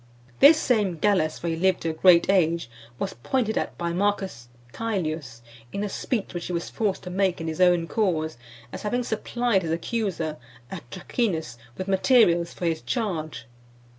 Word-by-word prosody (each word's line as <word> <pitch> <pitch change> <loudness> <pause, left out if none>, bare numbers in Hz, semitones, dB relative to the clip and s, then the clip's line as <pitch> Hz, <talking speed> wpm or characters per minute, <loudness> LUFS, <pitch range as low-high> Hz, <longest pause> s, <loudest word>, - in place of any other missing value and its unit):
This 300 +3 +8
same 210 - +1
Gallus, 155 -4 +1
for 170 - -5
he 165 - 0
lived 185 +2 +1
to 165 - -1
a - - -6
great 170 +1 +5
age, 170 -8 +2 0.3
was - - -3
pointed 220 - -1
at - - -2
by 170 0 -2
M. 175 +3 -2 0.7
Caelius, 160 - -3 0.3
in 200 - -3
a 205 - -2
speech 215 -1 -3
which 175 -1 -4
he - - -5
was 170 0 -3
forced 205 -4 -1
to 180 - -6
make 190 -1 +1
in 165 - -4
his 160 +2 -3
own 175 -2 +4
cause, 165 -8 0 0.4
as - - -6
having 245 +4 -1
supplied 235 -1 0
his 165 - -4
accuser, 170 -3 -2 0.3
Atracinus, 160 - -3 0.2
with 185 - -4
materials 190 -4 +4
for 175 - -5
his 165 -1 0
charge. 165 - -3
180 Hz, 170 wpm, -25 LUFS, 165-210 Hz, 0.7 s, This